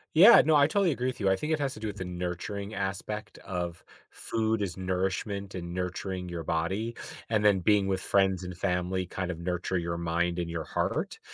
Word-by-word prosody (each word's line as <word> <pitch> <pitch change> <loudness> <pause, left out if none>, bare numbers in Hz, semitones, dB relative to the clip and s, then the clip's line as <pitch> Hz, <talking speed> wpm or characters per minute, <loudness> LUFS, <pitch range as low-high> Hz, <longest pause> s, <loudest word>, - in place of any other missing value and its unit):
Yeah, 205 +8 +10
no, 155 0 +4
I 145 -1 +7
totally 195 +1 +2
agree 125 -3 -1
with 130 - -3
you. 100 -3 +2
I 95 - +4
think 155 +9 -2
it 155 - 0
has 140 -2 -1
to - - -9
do 110 - -3
with 105 - -5
the 95 - -4
nurturing 90 +4 -4
aspect 100 +1 -4
of 85 -2 -4 0.3
food 110 -1 -1
is 90 -4 -3
nourishment 95 +2 -2
and 85 -1 -5
nurturing 90 0 -3
your 85 -1 -4
body, 95 +9 -1 0.3
and 110 -2 +2
then 100 -2 +5
being 100 +1 +3
with 95 -1 0
friends 95 -2 +2
and 90 -1 -6
family 90 0 0
kind 90 0 -4
of 85 -2 -4
nurture 90 +1 -1
your 85 0 -2
mind 85 +1 0
and 85 -1 -2
your 85 -1 -3
heart, - - -2
95 Hz, 210 wpm, -29 LUFS, 90-105 Hz, 0.3 s, Yeah